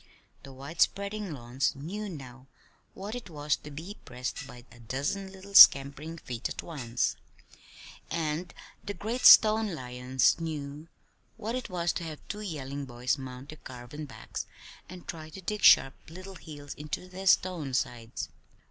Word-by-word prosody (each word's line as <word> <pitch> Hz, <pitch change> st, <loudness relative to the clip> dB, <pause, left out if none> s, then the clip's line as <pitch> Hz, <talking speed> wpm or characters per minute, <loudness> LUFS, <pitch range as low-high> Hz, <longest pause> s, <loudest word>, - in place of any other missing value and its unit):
The 135 Hz, -, -11 dB
wide 140 Hz, +5 st, -6 dB
spreading 200 Hz, -1 st, +1 dB
lawns 130 Hz, -1 st, -1 dB
knew 195 Hz, +9 st, -5 dB
now 130 Hz, -5 st, -10 dB, 0.5 s
what 200 Hz, +3 st, -6 dB
it 240 Hz, -5 st, -6 dB
was 150 Hz, -2 st, 0 dB
to 150 Hz, -, -11 dB
be 165 Hz, +8 st, -8 dB
pressed 125 Hz, +1 st, -5 dB
by 125 Hz, -2 st, -12 dB
a 120 Hz, -, -15 dB
dozen 140 Hz, -, -3 dB
little 195 Hz, +1 st, -12 dB
scampering 140 Hz, 0 st, +8 dB
feet 125 Hz, -5 st, -4 dB
at -, -, -6 dB
once: 125 Hz, -8 st, -1 dB, 0.9 s
and 165 Hz, +1 st, -2 dB, 0.3 s
the 205 Hz, -, -5 dB
great 230 Hz, +4 st, -3 dB
stone 215 Hz, -3 st, +8 dB
lions 125 Hz, +1 st, +1 dB
knew 150 Hz, -1 st, -5 dB, 0.5 s
what 225 Hz, 0 st, -4 dB
it 255 Hz, 0 st, -3 dB
was 175 Hz, -2 st, 0 dB
to -, -, -4 dB
have 155 Hz, -2 st, -6 dB
two 210 Hz, -, -5 dB
yelling 140 Hz, -7 st, -5 dB
boys 125 Hz, +2 st, -1 dB
mount 130 Hz, +1 st, -8 dB
their 155 Hz, -, -10 dB
carven 130 Hz, +4 st, -8 dB
backs, 135 Hz, -, -7 dB, 0.4 s
and 180 Hz, 0 st, -11 dB
try 160 Hz, -2 st, -6 dB
to 170 Hz, -, -10 dB
dig 210 Hz, +3 st, -3 dB
sharp 135 Hz, -6 st, +7 dB, 0.2 s
little 185 Hz, +4 st, -9 dB
heels 145 Hz, -5 st, -9 dB
into 150 Hz, +4 st, -5 dB
their 190 Hz, +1 st, -7 dB
stone 175 Hz, -7 st, +3 dB
sides. 120 Hz, -2 st, -3 dB
150 Hz, 155 wpm, -29 LUFS, 130-185 Hz, 0.9 s, scampering